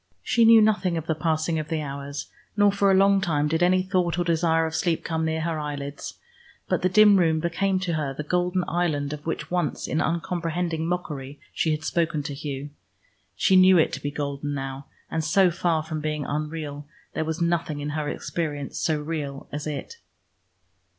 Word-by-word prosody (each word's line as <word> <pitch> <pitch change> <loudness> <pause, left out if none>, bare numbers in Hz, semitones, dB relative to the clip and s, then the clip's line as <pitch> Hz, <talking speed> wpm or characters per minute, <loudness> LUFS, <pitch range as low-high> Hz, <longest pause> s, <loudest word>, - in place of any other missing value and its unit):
She 235 -1 +3
knew 225 -1 +8
nothing 185 -5 +2
of 160 - -4
the 160 - 0
passing 160 0 0
of 155 - -4
the 160 0 -1
hours, 140 0 -5 0.3
nor 205 0 +5
for 200 0 +2
a 190 - +5
long 195 0 +4
time 150 -5 +1
did 160 +2 0
any 185 +1 +4
thought 180 -3 0
or 175 - +1
desire 165 -1 +2
of 160 - -4
sleep 165 0 0
come 160 -1 -1
near 160 0 -1
her 160 -1 -2
eyelids, 145 -1 -5 0.5
but - - 0
the 185 - +2
dim 210 +1 +7
room 160 -3 +3
became 185 +4 0
to 180 -3 -1
her 150 -3 -1
the 140 +3 -5
golden 180 +3 0
island 150 -5 -1
of 150 -1 -7
which 165 - -3
once 175 -4 -1
in 155 - 0
uncomprehending 170 -1 -1
mockery 145 -6 -4
she 160 - 0
had 155 0 -1
spoken 160 -2 0
to 140 - -5
Hugh. 140 0 -5 0.6
She 190 - +3
knew 185 0 +7
it 160 - +3
to - - -4
be 145 - -2
golden 145 0 -3
now, 135 0 -5 0.2
and 160 0 -1
so 180 +4 +4
far 170 -2 0
from 155 -1 -4
being 150 -1 -2
unreal, 150 -1 -4 0.3
there 160 - -1
was 160 +1 -3
nothing 170 -3 0
in 145 +1 -3
her 150 0 -2
experience 145 -5 -4
so 155 -2 +1
real 150 -3 -5
as 145 +1 -4
it. 150 - -5
160 Hz, 195 wpm, -25 LUFS, 150-175 Hz, 0.6 s, knew